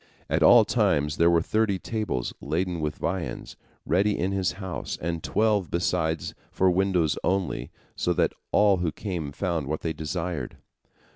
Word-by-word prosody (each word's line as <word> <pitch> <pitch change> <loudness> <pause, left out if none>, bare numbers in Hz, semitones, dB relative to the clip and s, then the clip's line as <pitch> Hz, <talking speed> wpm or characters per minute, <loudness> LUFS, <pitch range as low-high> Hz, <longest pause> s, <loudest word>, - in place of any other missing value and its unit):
At - - +2
all - - +8
times 75 +1 +1
there 85 +1 +5
were 85 -1 +3
thirty 110 -2 +1
tables 105 - -3
laden 85 +4 -1
with 75 -1 -2
viands 85 0 -4 0.3
ready 100 +4 +2
in 95 +3 0
his 95 -2 0
house, 95 -3 -5
and 85 0 -3
twelve 105 -3 +1
besides 85 -2 -1 0.2
for 95 0 +3
widows 90 -4 +1
only, 95 -1 -1 0.3
so 90 - 0
that 85 -1 +1 0.2
all 105 -2 +4
who 85 -2 -1
came 85 -6 -4
found 80 -2 -2
what 80 +2 -2
they 80 - -2
desired. 80 -3 -4
90 Hz, 155 wpm, -26 LUFS, 80-95 Hz, 0.3 s, all